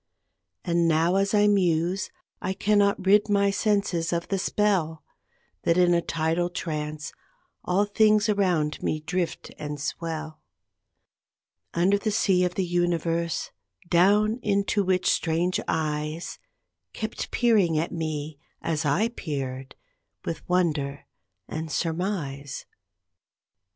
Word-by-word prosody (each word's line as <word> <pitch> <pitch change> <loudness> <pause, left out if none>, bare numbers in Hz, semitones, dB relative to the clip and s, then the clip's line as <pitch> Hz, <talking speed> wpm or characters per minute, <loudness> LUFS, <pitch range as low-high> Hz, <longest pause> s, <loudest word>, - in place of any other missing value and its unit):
And 170 -1 +2
now, 165 +2 +3
as 195 +1 +2
I 205 0 +5
muse, 185 -2 +2 0.3
I 190 - -1
cannot 200 -1 +2
rid 205 +2 +5
my 200 -1 +3
senses 195 -5 0
of 170 -1 -2
the 195 - 0
spell 180 -6 0 0.6
That 170 - +2
in 180 -1 +5
a 170 - +3
tidal 165 +2 0
trance 155 -3 -4 0.5
all 190 +3 +2
things 215 +1 +3
around 180 -8 +1
me 155 - -1
drift 175 +2 -3
and 150 -1 -5
swell 155 +1 -4 1.3
Under 190 +4 +3
the 215 - -1
sea 195 -4 +2
of 180 -1 -1
the 190 - 0
Universe, 170 -1 0 0.4
down 210 +6 +4
into 200 -1 +1
which 185 -1 +1
strange 170 +2 +1
eyes 155 +1 -2 0.5
Keep 220 0 -4
peering 210 -9 +3
at 160 +2 -1
me, 155 -2 -4 0.2
as 155 -2 -2
I 175 +11 +2
peered, 135 - -5 0.5
with 165 - -3
wonder 150 -6 0 0.4
and 160 0 -5
surmise. 155 -4 -3
175 Hz, 120 wpm, -26 LUFS, 155-200 Hz, 1.3 s, I